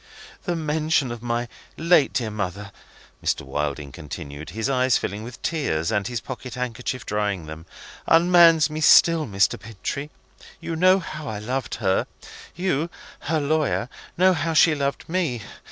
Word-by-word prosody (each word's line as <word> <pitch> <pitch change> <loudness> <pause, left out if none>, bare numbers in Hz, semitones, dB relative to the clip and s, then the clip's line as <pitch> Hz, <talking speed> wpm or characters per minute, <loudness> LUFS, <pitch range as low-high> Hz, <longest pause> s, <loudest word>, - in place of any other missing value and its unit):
"The 175 - -1
mention 155 -4 0
of 120 -1 -6
my 120 0 -2 0.3
late 165 -3 +4
dear 115 -4 -1
mother," 100 -1 -4 0.5
Mr. - - 0
Wilding 70 +1 -3
continued, 70 +2 -8
his 110 +7 -3
eyes 130 -2 +3
filling 100 +2 -4
with 120 +2 -9
tears 115 - -1
and 105 -1 0
his 120 -2 -3
pocket 125 0 -7
handkerchief 125 0 -4
drying 105 -5 -1
them, 80 +1 -9 0.4
"unmans 165 -1 +6
me 155 0 -5
still, 165 -1 +6
Mr. 100 -3 +1
Bintrey. 115 +7 -5 0.5
You 165 0 -4
know 185 +3 +5
how 155 -4 -6
I 110 - -4
loved 125 +5 -3
her; 95 -4 0 0.5
you 170 -3 0 0.3
(her 160 +1 -1
lawyer) 150 -4 0 0.3
know 185 +1 +5
how 165 0 -1
she 160 +1 +6
loved 140 -1 -2
me. 160 - -1
125 Hz, 155 wpm, -24 LUFS, 105-160 Hz, 0.5 s, unmans